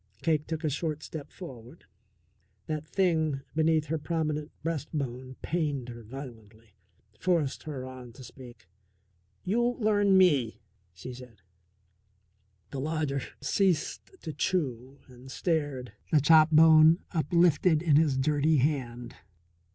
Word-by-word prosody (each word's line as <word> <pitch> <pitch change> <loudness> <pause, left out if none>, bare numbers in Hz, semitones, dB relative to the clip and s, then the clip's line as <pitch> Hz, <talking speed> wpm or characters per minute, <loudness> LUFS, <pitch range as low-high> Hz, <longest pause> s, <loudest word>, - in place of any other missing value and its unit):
Cake 155 -2 +1
took 160 0 -4
a 155 - +1
short 155 +1 -3
step 150 -3 -8
forward. 130 -4 -11 0.8
That 155 0 -4
thing 160 -7 +1
beneath 160 -1 +2
her 160 +1 -2
prominent 150 -1 -2
breastbone 140 -5 -4
pained 145 -7 -2
her 120 -1 -9
violently, 115 -4 -12 0.4
forced 170 -7 0
her 130 -4 -5
on 130 -2 -10
to 130 - -12
speak. 120 -6 -13 0.8
"You 215 +6 0
learn 205 -3 +3
me," 145 -12 +3 0.3
she 90 +9 -9
said. 120 -6 -13 1.3
The 140 - -4
lodger 150 -1 -2 0.2
ceased 175 +4 0
to 160 - -5
chew 135 -8 -2
and 125 0 -15
stared, 145 - -2 0.2
the 155 - +5
chop 155 +2 +6
bone 160 +1 +6
uplifted 170 0 +2
in 155 -4 +4
his 150 -4 +2
dirty 150 +3 +2
hand. 125 -3 -2
150 Hz, 120 wpm, -28 LUFS, 130-160 Hz, 1.3 s, chop